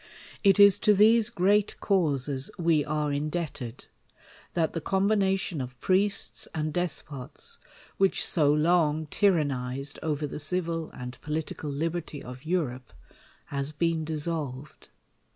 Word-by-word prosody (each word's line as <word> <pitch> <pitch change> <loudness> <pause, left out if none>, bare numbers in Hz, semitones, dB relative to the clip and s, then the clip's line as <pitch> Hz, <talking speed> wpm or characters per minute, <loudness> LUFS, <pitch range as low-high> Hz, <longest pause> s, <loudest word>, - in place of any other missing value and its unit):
Itis 200 -1 +7
to 210 - +4
th^se 220 +2 +5
great 200 +2 +2
causes 145 -8 0
we 165 -4 +2
are 150 -1 -1
indebted, 145 -5 -4 0.7
that 165 -2 +1
the 165 - -3
combination 195 -2 +1
of 125 -1 -8
priests 195 +2 +1
and 155 -1 -2
despots, 150 -6 -4 0.4
which 195 -1 +2
so 150 -4 +3
long 155 0 +2
ty 200 +7 +2
rannized 140 -5 -1
over 150 -1 -1
the 145 - -6
civil 165 0 -1
and 125 0 -9
political 150 0 -4
liberty 155 0 -3
of 125 +3 -10
Europe, 130 -9 -2 0.6
has 140 +1 -2
been 165 +1 0
dissolved. 150 -3 -5
155 Hz, 120 wpm, -27 LUFS, 145-180 Hz, 0.7 s, Itis